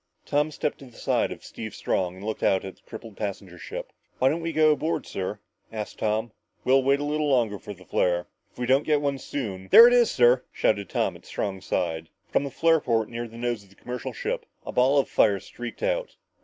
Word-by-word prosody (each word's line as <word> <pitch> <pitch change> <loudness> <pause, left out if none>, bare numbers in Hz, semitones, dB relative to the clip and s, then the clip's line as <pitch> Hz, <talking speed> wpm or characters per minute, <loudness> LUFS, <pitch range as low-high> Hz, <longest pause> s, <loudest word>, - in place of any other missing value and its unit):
Tom 150 +1 +1
stepped 150 -1 -3
to 140 - -11
the 125 - -16
side - - +1
of - - -8
Steve - - -7
Strong 90 -1 -1
and 95 - -11
looked 110 0 -3
out 95 0 +2
at 95 - -7
the - - -27
crippled 110 -2 -9
passenger 95 -4 -5
ship. - - -7 0.2
"Why 130 - +4
don't 160 +4 -1
we 165 0 -2
go 155 -1 +5
aboard, 155 +2 -1
sir?" 95 +2 -4 0.3
asked 110 -2 -6
Tom. 110 +1 0 0.3
"We'll 135 +1 +4
wait 140 +2 +3
a - - -2
little 150 0 0
longer 115 -7 +2
for 105 - -8
the 90 0 -17
flare. 90 0 +1 0.3
If - - -30
we 125 - -2
don't 135 +3 +4
get 150 -1 +1
it 140 -1 -1
soon 95 -9 -5
" - - -25
"There 230 - +11
it 245 - +4
is, 240 -2 +5
sir!" 125 +1 +4
shouted 100 -3 0
Tom - - 0
at - - -15
Strong's 95 -2 -4
side. 80 -2 -1 0.2
From - - +2
the 140 - -3
flare 165 +4 +3
port 115 -5 0
near 120 0 -4
the 115 +1 -12
nose 120 -2 -2
of 100 - -20
the 100 - -21
commercial 125 +2 -5
ship, - - -4 0.2
a - - -4
ball 130 +3 +3
of 140 - +3
fire 100 -3 +3
streaked 120 +5 -8
out. - - -1
120 Hz, 235 wpm, -26 LUFS, 100-145 Hz, 0.3 s, There